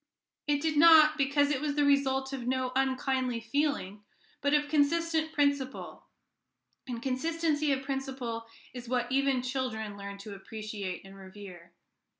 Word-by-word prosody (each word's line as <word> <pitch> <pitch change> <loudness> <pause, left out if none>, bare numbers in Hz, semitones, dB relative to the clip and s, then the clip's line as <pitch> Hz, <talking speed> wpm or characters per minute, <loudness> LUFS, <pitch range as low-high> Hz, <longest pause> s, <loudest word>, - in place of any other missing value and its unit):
It 290 -1 +1
did 315 -2 0
not, 310 -1 +8
because 285 0 +2
it 275 -2 -1
was 295 -1 -1
the 290 -1 +2
result 270 -1 +2
of 250 -3 -5
no 255 0 0
unkindly 260 -2 0
feeling, 230 -5 -2 0.4
but 285 - +1
of 295 0 +2
consistent 315 +2 +1
principle; 285 -3 -1 0.8
and 240 -2 -5
consistency 305 +2 0
of 270 -1 -1
principle 265 -4 -4 0.3
is 245 -2 -8
what 245 -1 -1
even 270 -1 +1
children 245 -5 -3
learn 200 0 -7
to 200 +1 -9
appreciate 200 -2 -6
and 195 0 -12
revere. 190 -3 -12
265 Hz, 145 wpm, -30 LUFS, 230-290 Hz, 0.8 s, not